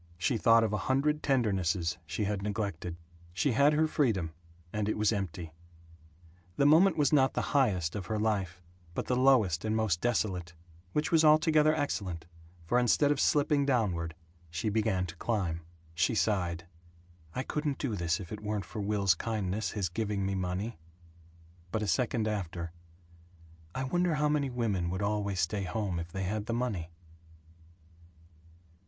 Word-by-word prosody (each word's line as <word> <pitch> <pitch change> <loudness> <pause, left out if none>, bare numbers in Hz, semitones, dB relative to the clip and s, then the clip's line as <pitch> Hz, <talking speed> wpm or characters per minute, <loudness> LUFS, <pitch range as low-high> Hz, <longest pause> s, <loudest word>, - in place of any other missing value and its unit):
She 90 +8 0
thought 115 +2 +5
of 110 -2 0
a - - +1
hundred 150 +3 +2
tendernesses 95 - 0
she 90 +7 -2
had 100 -1 -1
neglected. 100 -5 -3 0.4
She 130 +10 +1
had 140 +5 +4
her 155 +1 +3
freedom, 105 - 0 0.4
and 105 0 -1
it - - -1
was 105 +1 +2
empty. 85 -5 -4 1.0
The 140 - +3
moment 165 +5 +6
was 150 0 +2
not 135 -3 +4
the - - 0
highest 100 - +2
of 95 -4 -5
her 110 - -1
life, 95 -4 -1 0.3
but - - -2
the 125 - 0
lowest 125 -10 +4
and 110 0 0
most 110 -7 +1
desolate, 95 -7 -1 0.4
which 150 +3 0
was 160 -1 +5
altogether 155 0 +5
excellent, 95 - -3 0.4
for 120 +9 +2
instead 135 +4 +3
of 145 - 0
slipping 145 -1 +3
downward 95 - 0 0.3
she 85 +7 -2
began 105 -4 +1
to 80 -2 -8
climb. 90 -8 -1 0.3
She 90 +8 +1
sighed, 90 -6 0 0.7
"I 130 - -1
couldn't 150 -1 -2
do 125 -7 -2
this 85 0 0
if 90 -4 -9
it 105 -1 -6
weren't 105 -2 -3
for 105 +3 -6
Will's 100 -2 +2
kindness, 105 +1 -2
his 100 -3 -1
giving 100 +2 -2
me 95 - -1
money." 95 +2 -3 0.9
But 110 - -1
a - - -2
second 115 -1 +1
after: 90 -5 -3 1.0
"I 130 - -1
wonder 175 +5 +1
how 150 0 +1
many 145 -2 +1
women 105 -8 -1
would 95 +3 -2
always 100 -3 0
stay 100 +5 -1
home 95 -1 -2
if 85 0 -6
they 95 +2 -3
had 105 +3 -2
the 115 - -1
money?" 110 -9 -2
105 Hz, 165 wpm, -30 LUFS, 90-125 Hz, 1.0 s, moment